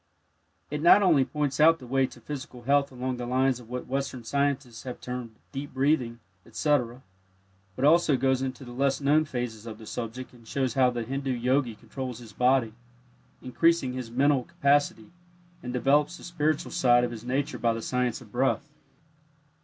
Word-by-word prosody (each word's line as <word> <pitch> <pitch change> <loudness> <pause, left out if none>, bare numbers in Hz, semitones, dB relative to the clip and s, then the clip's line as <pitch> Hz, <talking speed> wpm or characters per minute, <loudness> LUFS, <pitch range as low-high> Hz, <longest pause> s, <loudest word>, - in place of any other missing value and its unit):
It 150 0 -3
not 175 +5 +7
only 160 -8 +5
points 145 +1 -2
out 165 +2 +6
the 130 - -12
way 135 +1 +1
to 125 - -14
physical 130 -1 -8
health 140 +2 +2
along 130 0 -3
the 120 0 -5
lines 130 0 +1
of 120 -2 -14
what 125 0 -5
Western 135 -2 -3
scientists 140 -1 -1
have 125 -2 -7
termed 125 -3 -6 0.2
"deep 140 0 -6
breathing," 130 -4 +1 0.2
etc., 130 -4 -1 0.7
but 130 - 0
also 155 -2 +5
goes 130 0 +1
into 130 0 -4
the 120 - -9
less 135 +2 0
known 150 +2 +3
phases 120 -5 -5
of 110 -2 -7
the 110 - -12
subject, 120 +3 -6
and 115 -2 -18
shows 130 -2 -1
how 130 -1 +4
the 120 -1 -3
Hindu 135 +3 -3
Yogi 125 0 0
controls 125 +2 -6
his 115 -3 -12
body, 125 -3 +2 0.7
increasing 135 0 +2
his 125 -2 -5
mental 135 +2 +2
capacity, 140 -4 +1 0.5
and 125 - -5
develops 145 +6 +2
the - - -14
spiritual 155 -3 -1
side 120 -1 +4
of 120 - -1
his 115 -2 -8
nature 130 +3 -2
by 115 - +2
the 115 0 -3
"Science 125 -1 -1
of 110 -4 -15
Breath." 135 +4 0
130 Hz, 180 wpm, -27 LUFS, 120-140 Hz, 0.7 s, not